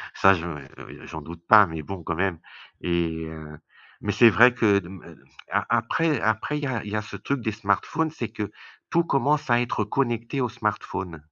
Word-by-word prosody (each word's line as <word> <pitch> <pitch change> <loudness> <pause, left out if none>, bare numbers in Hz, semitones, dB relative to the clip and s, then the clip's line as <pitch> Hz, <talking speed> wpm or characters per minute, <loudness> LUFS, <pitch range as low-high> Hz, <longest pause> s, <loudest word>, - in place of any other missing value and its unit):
ça 95 0 +6
je, 85 0 -5
heu, 75 -4 -7 0.4
j'en 80 - -7
doute 85 +2 -10
pas, 105 -2 +8
mais 80 -1 -5
bon, 90 +2 -7
quand 85 - -2
même 95 -2 0 0.4
et 85 -2 -1
heu, 75 -1 -9 0.4
mais 105 - -1
c'est 115 +2 +7
vrai 120 +3 +6
que 105 -5 +3
de 85 - -11
hem, 95 -2 -11
heu, - - -13 0.3
a - - +1
après 120 +5 +1
après 110 +7 0
il - - -7
y - - 0
a 125 -4 -2
il 105 - -7
y - - -2
a 105 - 0
ce 105 - -9
truc 140 -3 -2
des 110 - -1
smartphones, 115 - 0
c'est 120 -7 -5
que 105 -1 -5 0.4
tout 170 0 +3
commence 145 -1 +1
à 120 0 +4
être 120 -3 -1
connecté 120 +3 -1
au 120 - 0
smartphone. 100 -6 -3
105 Hz, 215 wpm, -25 LUFS, 85-120 Hz, 0.4 s, pas